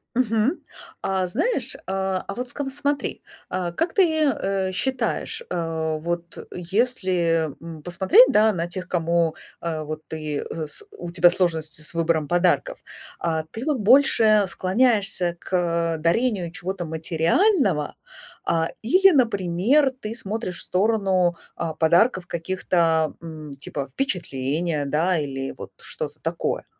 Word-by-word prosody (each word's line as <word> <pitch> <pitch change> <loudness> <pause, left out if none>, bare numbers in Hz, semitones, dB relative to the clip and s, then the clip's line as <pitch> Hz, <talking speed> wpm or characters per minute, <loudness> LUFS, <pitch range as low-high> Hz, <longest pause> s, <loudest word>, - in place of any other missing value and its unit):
Мгм. 230 - +1 0.4
А 190 -1 0
знаешь, 310 - 0
а, 190 -1 -1
а - - -5
вот 250 +1 -4
скам 270 +2 -4
смотри, 285 +1 -2 0.3
а 180 -2 -2
как 330 - -1
ты, 325 -5 +3
э, 195 -9 0
считаешь, 265 - -2
а 160 -2 -2
вот 170 +2 -4 0.2
если, 180 - 0
м, 165 -2 -9
посмотреть, 190 - +6
да, 215 +1 +4
на 170 -2 -2
тех, 185 +1 -6
кому, 170 -1 +1 0.2
а, 160 -2 -3
вот 155 +1 -7
ты, 155 -2 -4
э, 160 -2 -5
с 420 - -5
у 170 - -6
тебя 175 0 +6
сложности 160 -4 -1
с 150 - -3
выбором 160 -2 0
подарков, 175 0 +1 0.4
а 160 -2 -1
ты 230 +4 -6
вот 295 -5 0
больше 220 -3 +5
склоняешься 190 -3 +1
к, - - -13 0.4
а, - - -4
дарению 180 +2 +1
чего-то 185 0 -4
материального, 165 - +1 0.5
а, 165 0 +1
или, 370 - +6
например, 235 - +2
ты 215 0 -5
смотришь 215 -5 -4
в - - -4
сторону, 190 -3 +2 0.2
а, 165 -2 -2
подарков 175 +5 +3
каких-то, 165 -2 0
м, 155 -3 -8
типа 140 -1 -5
впечатления, 155 - -2
да, 160 +6 +1
или 135 -2 -3
вот - - -9
что-то - - -6
такое? - - -2
180 Hz, 135 wpm, -23 LUFS, 165-220 Hz, 0.5 s, посмотреть